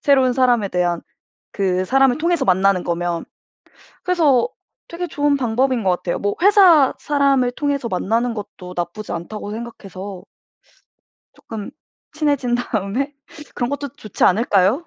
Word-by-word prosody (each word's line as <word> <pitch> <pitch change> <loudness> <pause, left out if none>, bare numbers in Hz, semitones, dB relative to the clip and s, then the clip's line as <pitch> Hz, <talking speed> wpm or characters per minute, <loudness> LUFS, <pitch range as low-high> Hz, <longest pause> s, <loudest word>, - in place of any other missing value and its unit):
새로운 265 -3 +4
사람에 245 -5 +2
대한, 175 -2 0 0.5
그 185 -2 0
사람을 270 +3 +3
통해서 335 -3 +1
만나는 190 -1 +3
거면. 170 0 -2 0.8
그래서 335 - +3 0.4
되게 350 +1 -4
좋은 290 -3 +1
방법인 250 0 0
것 185 - +3
같아요. 175 -1 -1
뭐 205 0 -1
회사 370 -9 +6
사람을 275 -3 +2
통해서 280 -2 -2
만나는 230 +5 0
것도 185 -3 -8
나쁘지 175 +5 -4
않다고 205 +5 -6
생각해서 200 -4 -8 1.1
쪼끔 215 -3 -8 0.4
친해진 285 -6 0
다음에 245 +4 -2 0.4
그런 240 +1 -1
것도 285 0 -4
좋지 215 - -4
않을까요? 205 - +2
240 Hz, 305 characters per minute, -20 LUFS, 195-280 Hz, 1.1 s, 회사